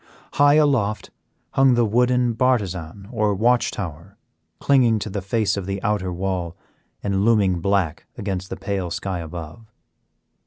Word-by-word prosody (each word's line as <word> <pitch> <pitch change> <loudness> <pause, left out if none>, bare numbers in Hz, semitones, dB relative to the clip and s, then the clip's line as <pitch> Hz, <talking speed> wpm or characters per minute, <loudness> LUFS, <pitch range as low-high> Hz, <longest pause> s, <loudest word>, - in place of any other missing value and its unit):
High 145 0 +5
aloft 130 -9 +1 0.4
hung 135 -2 +4
the 120 -1 +3
wooden 125 +2 +2
bartizan 100 -7 -1
or 105 -4 +1
watch 120 +4 +2
tower, 90 +1 -7 0.4
clinging 125 -5 +3
to 105 0 -5
the 100 0 -3
face 100 +1 0
of 100 -2 -5
the 100 0 -2
outer 105 -4 0
wall 90 -2 -3 0.5
and 100 -1 0
looming 100 -6 +3
black 95 -4 0
against 95 -2 -4
the - - -5
pale 95 -3 -3
sky 90 +1 -3
above. 85 +6 -9
100 Hz, 145 wpm, -22 LUFS, 95-115 Hz, 0.5 s, High